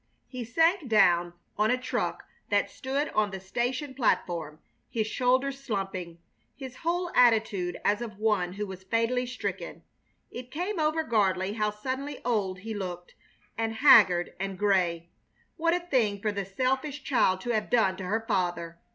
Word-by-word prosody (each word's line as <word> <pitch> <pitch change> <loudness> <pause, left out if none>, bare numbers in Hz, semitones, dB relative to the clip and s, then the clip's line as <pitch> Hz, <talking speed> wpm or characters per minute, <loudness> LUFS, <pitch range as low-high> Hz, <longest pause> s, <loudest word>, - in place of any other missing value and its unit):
He 255 -2 -6
sank 325 - +2
down 175 -5 +4 0.3
on 215 +1 +3
a 250 - +3
truck 255 - -3 0.2
that - - +1
stood 275 +3 -2
on 215 -1 +1
the 190 -1 -6
station 245 +8 -2
platform, 170 - 0 0.3
his 220 -2 -1
shoulders 260 +4 0
slumping, 195 -7 -4 0.4
his 260 -2 -9
whole 345 +1 -1
attitude 215 -7 +3
as 205 +3 +2
of 220 -4 -6
one 205 -5 +1
who 210 +2 -3
was 190 -2 -8
fatally 230 +5 0
stricken. 250 0 -5 0.5
It 245 0 -8
came 355 +6 -3
over 310 +1 +1
Gardley 200 -6 +1
how 210 -1 0
suddenly 260 +7 -5
old 195 -6 -1
he 225 +2 -5
looked, 180 -3 -6 0.4
and 225 0 -2
haggard 205 -9 +6
and 195 -1 -3
gray! 175 -4 +1 0.4
What 335 +1 +2
a - - 0
thing 245 - 0
for 210 +1 -1
the 200 -1 -3
selfish 265 +7 -1
child 215 -9 +2
to 240 - -2
have 215 -2 -1
done 220 -6 +3
to 190 - -6
her 220 +4 -1
father! 175 -4 -1
220 Hz, 160 wpm, -28 LUFS, 190-260 Hz, 0.5 s, haggard